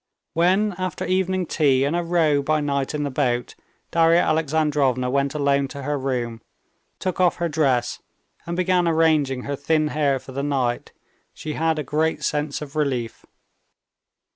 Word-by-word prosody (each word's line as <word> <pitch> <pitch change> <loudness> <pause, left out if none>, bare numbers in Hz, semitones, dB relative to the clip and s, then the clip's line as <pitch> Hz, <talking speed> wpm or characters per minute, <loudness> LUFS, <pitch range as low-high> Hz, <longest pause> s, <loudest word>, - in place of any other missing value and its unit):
When, 190 +5 +2
after 185 -1 -3
evening 185 0 0
tea 140 -5 +2
and 145 +4 0
a 175 - +1
row 165 -4 +2
by 155 +2 +1
night 140 -1 -1
in 150 - -1
the 140 - -2
boat, 125 -3 -1 0.4
Darya 165 0 +4
Alexandrovna 150 -5 +1
went 140 +1 0
alone 140 -1 +1
to 140 0 -8
her 145 +2 -1
room, 125 -4 -3 0.6
took 185 -1 -3
off 180 -1 +4
her 175 - -1
dress, 145 -6 0 0.5
and 170 0 -3
began 180 -1 +2
arranging 155 -6 +2
her 140 - -3
thin 155 +2 +1
hair 145 -2 +1
for 130 - -11
the 135 +1 -3
night, 130 -4 -1 0.4
she 155 - -5
had 160 0 0
a 150 - -2
great 155 +3 -1
sense 150 -1 -1
of 145 0 -11
relief. 130 -7 -2
150 Hz, 165 wpm, -23 LUFS, 135-165 Hz, 0.6 s, Darya